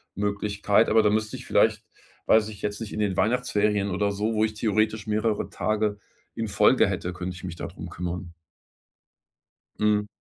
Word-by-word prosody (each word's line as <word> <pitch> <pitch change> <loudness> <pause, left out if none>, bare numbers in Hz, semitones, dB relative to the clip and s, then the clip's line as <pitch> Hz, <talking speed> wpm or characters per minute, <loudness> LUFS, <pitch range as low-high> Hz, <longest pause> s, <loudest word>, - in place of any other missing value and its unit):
Möglichkeit. 100 0 +1
Aber 110 0 +5
da 105 - +4
müsste 110 0 -1
ich - - -11
vielleicht - - +2 0.5
weiß 110 -1 +5
ich 105 -2 -10
jetzt 105 +1 -3
nicht, 110 - -5
in - - -5
den 100 -3 0
Weihnachtsferien 105 -3 +1
oder 100 +2 0
so, 105 +3 -1
wo 110 0 +2
ich 110 0 0
theoretisch 110 0 0
mehrere 105 0 0
Tage 105 -1 -1 0.4
in 115 -1 -3
Folge 105 +6 +4
hätte 90 -2 -3
könnte 90 0 -5
ich 90 - -9
mich 90 -2 -5
da - - -5
drum - - -9
kümmern. 90 0 -5 1.5
Mhm. 105 -1 +2
105 Hz, 175 wpm, -26 LUFS, 100-110 Hz, 1.5 s, Aber